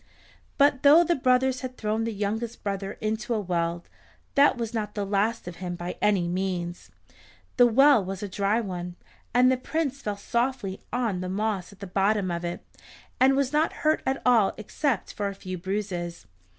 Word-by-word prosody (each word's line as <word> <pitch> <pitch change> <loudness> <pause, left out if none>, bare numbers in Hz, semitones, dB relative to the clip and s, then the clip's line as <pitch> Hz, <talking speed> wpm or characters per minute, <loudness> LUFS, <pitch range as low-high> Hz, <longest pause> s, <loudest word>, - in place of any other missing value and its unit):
But 280 -2 +4
though 300 +4 +7
the 345 - +2
brothers 255 -2 +2
had 255 -1 -6
thrown 220 +1 -1
the 230 - -2
youngest 215 +3 -3
brother 195 0 -3
into 220 +2 -1
a - - 0
well, 170 -3 -1 0.5
that 280 -2 +5
was 230 -1 -4
not 210 -2 -3
the 205 -1 -2
last 205 +2 0
of 175 -1 -7
him 175 0 -4
by 175 +1 -5
any 200 -4 +2
means. 180 -1 -3 0.7
The 245 -1 +7
well 270 -1 +5
was 195 +1 -5
a - - -2
dry 200 +3 0
one, 180 -4 -5 0.4
and 250 +2 +5
the 260 - +2
Prince 275 0 -2
fell 210 -4 -3
softly 235 -3 -2
on 230 -7 -1
the 185 - -4
moss 200 -1 -2
at 200 0 -18
the - - -5
bottom 195 0 +1
of 170 0 -3
it, 175 0 -5 0.5
and 265 +1 +5
was 275 0 0
not 310 +2 +2
hurt 310 +1 +3
at 265 0 -1
all 230 -6 +4
except 235 +2 -2
for 205 - -2
a 200 - -5
few 185 -2 -6
bruises. 185 -2 -4
210 Hz, 190 wpm, -26 LUFS, 190-250 Hz, 0.7 s, though